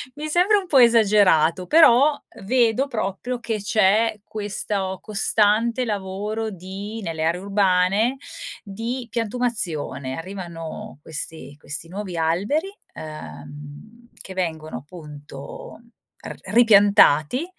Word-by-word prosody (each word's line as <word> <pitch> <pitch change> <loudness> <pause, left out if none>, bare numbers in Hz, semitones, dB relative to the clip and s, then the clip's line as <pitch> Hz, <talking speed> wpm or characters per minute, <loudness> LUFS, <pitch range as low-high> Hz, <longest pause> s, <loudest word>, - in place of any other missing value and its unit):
Mi 300 +1 -5
sembra 365 +6 +4
un 375 - -9
po' 285 - +3
esagerato, 200 -7 +4
però 295 -2 +6 0.3
vedo 245 +3 +2
proprio 235 +2 -3
che 225 -2 -3
c'è 215 +2 +2
questo 200 -2 -3
costante 215 +3 +1
lavoro 210 +1 -3
di 200 +3 -7
nelle 160 -2 -3
aree 170 +3 0
urbane, 200 +4 +2 0.5
di 230 +5 -5
piantumazione. 200 - -2
Arrivano 170 -4 -8
questi 155 -2 -6
questi 150 +3 -6
nuovi 190 -1 -6
alberi, 200 - 0 0.2
ehm, 150 - -11
che 190 - -9
vengono 160 -5 -3
appunto 145 - -11 0.5
r - - -7 0.2
ripiantati 205 - +5
200 Hz, 100 wpm, -22 LUFS, 165-230 Hz, 0.5 s, però